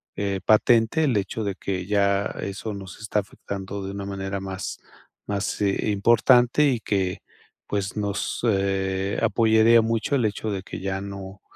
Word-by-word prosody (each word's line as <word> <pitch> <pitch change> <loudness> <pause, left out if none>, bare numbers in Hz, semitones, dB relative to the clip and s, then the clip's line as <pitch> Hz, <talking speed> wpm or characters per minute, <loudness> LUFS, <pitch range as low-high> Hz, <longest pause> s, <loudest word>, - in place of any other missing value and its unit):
eh, 100 -1 -1
patente 115 +7 +4
el 135 -6 +2
hecho 100 +3 -2
de 100 -1 -1
que 95 -1 -4
ya 100 0 +2 0.2
eso 105 +2 -4
nos 95 -1 -9
está 105 -1 -1
afectando 100 0 -6
de 95 - -4
una 100 0 -5
manera 95 0 -4
más 95 0 -5 0.5
más, 100 0 -2
eh, 100 +1 +1
importante 120 +6 +4
y 125 - 0
que, 95 -3 -1 0.5
pues, 100 0 -2
nos, 100 -1 -2
eh, 95 -1 0
apoyaría 115 +1 +5
mucho 115 +4 -1
el 125 -5 +2
hecho 105 +1 -2
de 95 -2 -3
que - - -8
ya 95 0 -3
no 100 -1 -8
100 Hz, 160 wpm, -24 LUFS, 95-110 Hz, 0.5 s, apoyaría